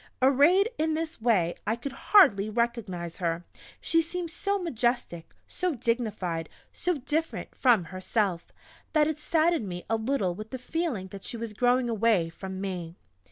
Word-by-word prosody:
Arrayed 285 - +5
in 315 0 +1
this 320 -4 -4
way 190 -8 +3
I 220 - +2
could 245 +4 -6
hardly 275 - +5
recognize 215 -7 -2
her; 170 -1 -1 0.3
she 330 0 +2
seemed 340 0 -4
so 400 +4 -1
majestic, 240 - -1 0.2
so 360 -4 -2
dignified 215 -9 -2 0.2
so 360 -1 -1
different 300 +4 -2
from 240 -8 +4
herself, 185 0 -2 0.4
that 305 -2 +5
it 310 -1 -2
saddened 320 - +1
me 175 0 -5
a 225 - +3
little 220 -5 0
with 215 +4 -8
the 260 - -5
feeling 255 - -3
that 195 0 -9
she 235 - -5
was 230 -1 -5
growing 245 +2 +2
away 220 -6 +2
from 190 +3 -7
me. 180 -4 -4
235 Hz, 160 wpm, -28 LUFS, 190-310 Hz, 0.4 s, Arrayed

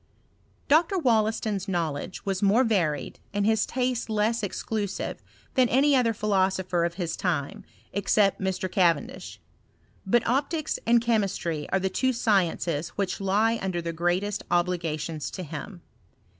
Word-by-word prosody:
Dr. 335 +6 +4
Wollaston's 220 - +1
knowledge 170 -2 -3
was 195 -1 -1
more 205 +5 +4
varied, 170 - 0 0.2
and 205 0 +1
his 220 0 +2
taste 250 -2 -1
less 220 +2 +1
exclusive 205 0 -3 0.3
than 255 -2 +3
any 275 +3 +4
other 245 -3 +3
philosopher 190 -4 +1
o£ - - -19
his 175 -3 -3
time, 160 -7 -2 0.3
except 200 +1 +2
Mr. 190 0 -1
Cavendish: 170 -6 0 0.6
but 235 +4 +2
optics 290 +5 0
and 235 0 +5
chemistry 200 -9 -1
are 190 - +1
the 190 - 0
two 260 +7 0
sciences 175 -8 +1
which 200 -1 -2
lie 215 +4 +2
under 185 -2 -2
the 170 0 -4
greatest 175 +5 0
obligations 165 -3 -1
to 185 - -6
him. 170 +4 -8
195 Hz, 135 wpm, -26 LUFS, 175-225 Hz, 0.6 s, and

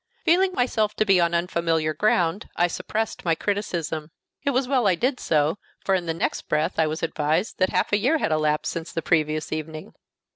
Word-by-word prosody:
Feeling 365 +3 +4
myself 225 -7 0
to 215 - +1
be 195 -3 +4
on 170 0 +2
unfamiliar 165 -2 0
ground, 175 +2 +1
I 175 - +3
suppressed 215 +5 -3
my 165 -2 +2
criticism. 170 -6 -2 0.3
It 285 - +1
was 260 -1 +1
well 255 -5 +2
I 185 - +4
did 250 +8 0
so, 155 +4 +1 0.3
for 195 - +2
in 180 -2 0
the 165 - 0
next 165 - -2
breath 155 +3 0
I 160 - +4
was 155 +2 -4
advised 160 +5 -1
that 185 0 +3
half 185 +2 0
a 205 - +4
year 270 +10 +2
had 230 - -1
elapsed 155 -1 +1
since 165 0 -5
the 165 - -3
previous 155 -1 0
evening. 155 0 -5
170 Hz, 205 wpm, -24 LUFS, 155-210 Hz, 0.3 s, Feeling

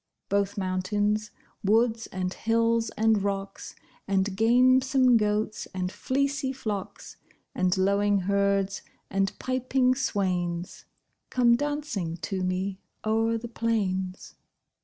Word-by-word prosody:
Both 200 0 0
mountains, 205 +3 0 0.3
woods, 225 +2 +2
and 185 0 -3
hills, 230 0 +1
and 220 -1 +3
rocks 195 0 -4 0.3
And 195 0 0
gamesome 255 +3 +4
goats, 215 0 0
and 180 0 -2
fleecy 275 +2 -1
flocks, 210 -7 -6 0.4
And 185 0 +1
lowing 200 +1 +2
herds, 200 0 +1 0.3
and 195 0 +1
piping 255 0 +1
swains, 180 -8 -2 0.4
Come 240 -2 +4
dancing 285 - -3
to 185 +4 -3
me 185 +1 -2 0.3
o'er 225 +1 +1
the 235 +1 -6
plains. 195 -5 -2
205 Hz, 105 wpm, -27 LUFS, 190-230 Hz, 0.4 s, gamesome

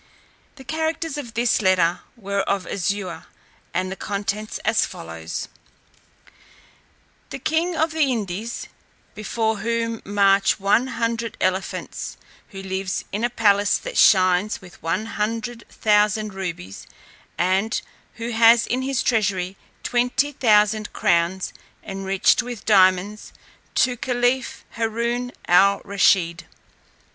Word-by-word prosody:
The 270 - -12
characters 320 +1 -2
of 245 -6 -7
this 235 0 +2
letter 180 -3 +3 0.2
were 200 -2 -3
of 195 -2 0
azure, 195 -1 -3 0.4
and 185 +1 -2
the - - -4
contents 205 +2 -3
as - - +3
follows: 80 0 -6 1.8
"The - - -5
king 320 +6 0
of 320 0 +1
the 310 -4 +1
Indies, 215 0 -4 0.5
before 220 +1 -1
whom 230 0 -2
march 200 0 +3
one 205 +6 +2
hundred 230 -1 -2
elephants, 185 +1 -3 0.3
who 195 -1 -9
lives 190 0 -3
in 210 +3 -3
a 240 - +2
palace 205 -3 +3
that - - -7
shines 185 +1 +4
with 180 -2 -15
one 165 +7 -1
hundred 230 +2 -3
thousand 210 0 +1
rubies, 170 - -6 0.5
and 190 +6 +1 0.4
who 235 +1 -5
has 230 +1 +6
in 255 +2 -1
his 270 -1 -1
treasury 195 -5 0 0.3
twenty 250 +4 +1
thousand 215 -4 +2
crowns 170 +2 +1 0.3
enriched 195 +2 +1
with 245 -3 -8
diamonds, 195 0 +3 0.4
to 250 -1 +3
caliph 245 +1 -1
Haroon 235 +2 -1 0.2
al 195 +3 +5
Rusheed. 190 -4 +2
210 Hz, 115 wpm, -22 LUFS, 190-235 Hz, 1.8 s, has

